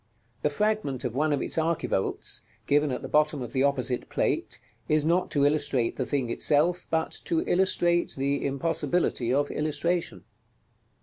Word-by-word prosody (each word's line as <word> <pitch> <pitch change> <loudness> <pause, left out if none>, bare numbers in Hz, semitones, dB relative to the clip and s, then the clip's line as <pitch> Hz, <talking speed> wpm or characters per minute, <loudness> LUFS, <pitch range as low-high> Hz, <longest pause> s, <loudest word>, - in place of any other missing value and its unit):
The - - +2
fragment 175 - -1
of 125 -3 -2
one 150 +4 +1
of 145 - 0
its - - -3
archivolts, 160 -11 -1 0.2
given 145 +1 +2
at 125 - -4
the - - -4
bottom 150 -2 +2
of 120 - -8
the 130 - +1
opposite 130 -3 0
Plate, - - -1 0.3
is 155 -1 +2
not 175 +3 +2
to 145 -1 +2
illustrate 145 -5 +1
the 130 - -3
thing 130 -5 -1
itself, 160 +8 +2
but 160 0 0
to 165 - +1
illustrate 175 -2 +2
the 140 +1 0
impossibility 160 -2 0
of 145 +2 +1
illustration. 155 +3 -1
145 Hz, 160 wpm, -27 LUFS, 135-165 Hz, 0.3 s, The